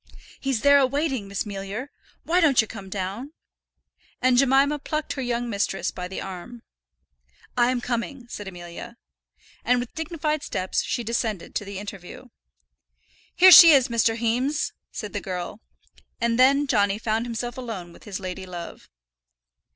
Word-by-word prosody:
"He's 270 -5 -1
there 285 0 +6
a 265 - +4
waiting, 270 -6 -2
Miss 200 +2 -3
Mealyer. 205 +6 -6 0.3
Why 355 +2 +2
don't 290 -6 +4
yer 220 - +5
come 200 -3 -10
down?" 200 +9 -5 0.9
and 255 0 +3
Jemima 275 +3 +3
plucked 305 +2 -3
her 270 - -5
young 240 -1 -2
mistress 200 -3 -1
by 180 0 -6
the 190 - -6
arm. 195 +5 -8 0.9
"I 240 0 +3
am 255 -1 -1
coming," 245 +2 -3
said 205 -4 -8
Amelia. 180 +6 -9 0.7
And 250 0 +2
with 245 -1 -6
dignified 310 -2 -2
steps 185 -8 -2
she 240 - -3
descended 225 -4 -3
to 205 - -3
the 200 -1 -7
interview. 200 +4 -9 1.1
"Here 370 +1 +8
she 335 -2 +11
is, 270 -2 +4
Mr. 230 -1 +2
Heames," 250 +6 0 0.2
said 210 -2 -6
the 205 - -3
girl. 180 +3 -5 0.6
And 235 0 0
then 275 +3 +5
Johnny 205 -6 +2
found 225 +1 -1
himself 240 +1 -4
alone 220 -10 -7
with - - -17
his 200 -3 -5
lady 185 0 -6
love. 175 -2 -9
235 Hz, 160 wpm, -24 LUFS, 200-270 Hz, 1.1 s, she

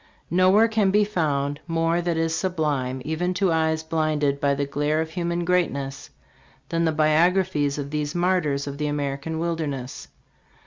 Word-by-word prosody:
Nowhere 185 +5 +5
can 220 -3 +2
be 210 +2 +4
found 145 -8 -1
' - - -35
' - - -36
more 165 +1 +2
that 170 -1 -1
is 165 0 0
sublime 145 -9 -1
even 175 +4 -1
to 190 -1 +2
eyes 160 -1 +1
blinded 155 -3 0
by 140 -1 +2
the 140 0 -1
glare 145 +2 0
of 160 0 -2
human 170 0 -2
greatness 140 -7 -1 0.2
' - - -31
' - - -32
than 165 0 0
in - - +2
the 160 - +2
biographies 155 -1 +2
of 140 -1 -5
these 150 0 -2
martyrs 175 -6 +1
of 140 0 -6
the 150 - 0
American 145 +2 -3
wilderness. 155 -6 -3
160 Hz, 185 wpm, -24 LUFS, 145-175 Hz, 0.2 s, Nowhere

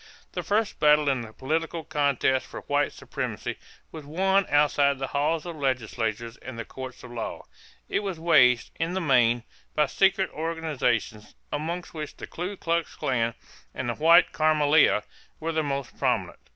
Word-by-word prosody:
The - - -3
first 215 +1 0
battle 150 0 +5
in 130 -3 +1
the 110 -2 -8
political 160 +6 -2
contest 140 -3 +1
for - - -8
white - - 0
supremacy - - -5 0.3
was 160 -2 -8
won 190 +6 +1
outside 145 -1 +3
the 135 - -2
halls 150 +3 +1
of 170 -1 -6
legislatures 115 -3 -2
and 130 -3 -9
the 115 - -5
courts 130 -1 -9
of 125 - -10
law. 115 -2 -5 0.4
It - - 0
was 195 -5 -4
waged, 125 -8 +4
in 165 +2 -1
the - - +1
main, 120 -7 +3 0.3
by 150 - +4
secret 190 +5 +2
organizations, 150 -9 -2 0.2
among 165 +4 -2
which 155 -2 -7
the - - -7
Ku 185 +4 -5
Klux 170 -1 -1
Klan 115 -3 0 0.4
and 125 -2 -3
the - - 0
White 165 +6 +5
Camelia 155 -6 +4 0.4
were 165 +1 -2
the 160 -1 +1
most 140 -3 -3
prominent. - - 0
150 Hz, 165 wpm, -26 LUFS, 130-165 Hz, 0.4 s, battle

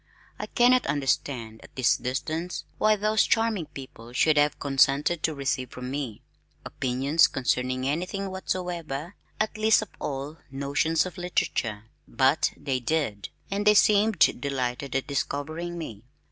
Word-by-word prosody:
I - - -4
cannot 250 +1 +4
understand 125 -5 -1
at - - -16
this 130 -3 +3
distance 155 +7 -3 0.2
why 215 0 +4
those 215 +1 +2
charming 225 -7 +1
people 120 -3 -11
should 155 +5 +3
have 145 0 +2
consented 140 +4 +2
to 160 - 0
receive 135 -2 -2
from 125 0 -7
me, 135 -6 -4 0.4
opinions 135 +5 +2
concerning 130 0 -1
anything 185 +6 -2
whatsoever, 175 -4 -4 0.4
least 220 0 +4
of - - -11
all 140 +3 -4
notions 145 +4 +1
of 185 0 -7
literature, 115 -11 -1 0.2
but 135 +3 +2
they 135 -3 -2
did, 125 -7 -1 0.2
and 205 +1 -1
they 210 - +7
seemed 210 +1 +4 0.2
delighted 135 -1 -2
at 135 - 0
"discovering" 155 +5 -3
me. 115 -11 -7
145 Hz, 135 wpm, -26 LUFS, 130-175 Hz, 0.4 s, they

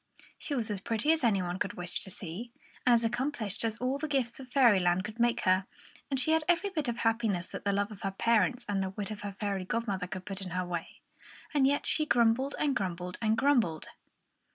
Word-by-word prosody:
She 290 - -3
was 225 -4 -1
as 205 - -2
pretty 225 +8 +1
as 320 -3 +2
any 200 -6 +3
one 175 +1 -3
could - - -1
wish 175 0 -4
to 195 - -4
see, 190 +5 -5 0.4
and 245 - +7
as 235 -1 +4
accomplished 235 -4 -2
as 225 -1 -1
all 255 +3 -1
the 310 - -2
gifts 265 -5 -1
of 260 -1 -10
Fairyland 190 -9 +4
could 215 +3 -8
make 240 0 +2
her; 185 +1 +2 0.4
and 270 -2 0
she 315 - +2
had 320 0 +3
every 355 +3 +2
bit 310 -7 -1
of 240 0 -1
happiness 225 -6 0
that - - -7
the 200 - +3
love 200 +1 0
of 205 - -10
her 195 - -1
parents 235 +5 +2
and 200 -2 0
the 190 - -1
wit 200 +2 -5
of 210 - -6
her 205 -1 -5
fairy 200 -3 -1
godmother 195 -2 -2
could 185 0 -6
put 195 -1 -3
in 190 - -4
her 185 - 0
way. 175 -2 -5 0.5
And 275 -3 +4
yet 285 +1 +1
she 310 -1 +1
grumbled 240 +3 +3
and 285 -3 +1
grumbled 180 -4 -3
and 220 -1 +2
grumbled! 235 - +2
225 Hz, 230 wpm, -30 LUFS, 190-255 Hz, 0.5 s, and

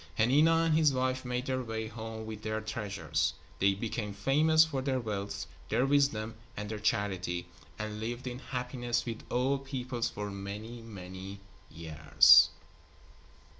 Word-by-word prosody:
Hanina 155 +8 +4
and 160 -2 +3
his 155 -2 +5
wife 130 0 0
made 125 0 -2
their 130 -1 -1
way 110 -2 -4
home 110 0 -7
with 110 -1 -7
their 110 0 -2
treasures. 95 -8 -2 0.2
They 100 0 +3
became 105 -1 -4
famous 155 +9 +4
for 140 -4 -3
their 130 -1 0
wealth, 105 -4 -4 0.2
their 130 - +2
wisdom 135 -6 +2 0.2
and 105 0 -4
their 110 -1 -4
charity, 95 -5 -1 0.3
and 105 0 -4
lived 120 +3 -4
in 125 0 -5
happiness 125 -2 -2
with 115 -2 -5
all 130 +3 +1
peoples 130 -3 -3
for 105 0 -5
many, 105 +4 -7
many 95 -2 -8 0.3
years. 80 -1 +6
115 Hz, 145 wpm, -31 LUFS, 100-130 Hz, 0.3 s, years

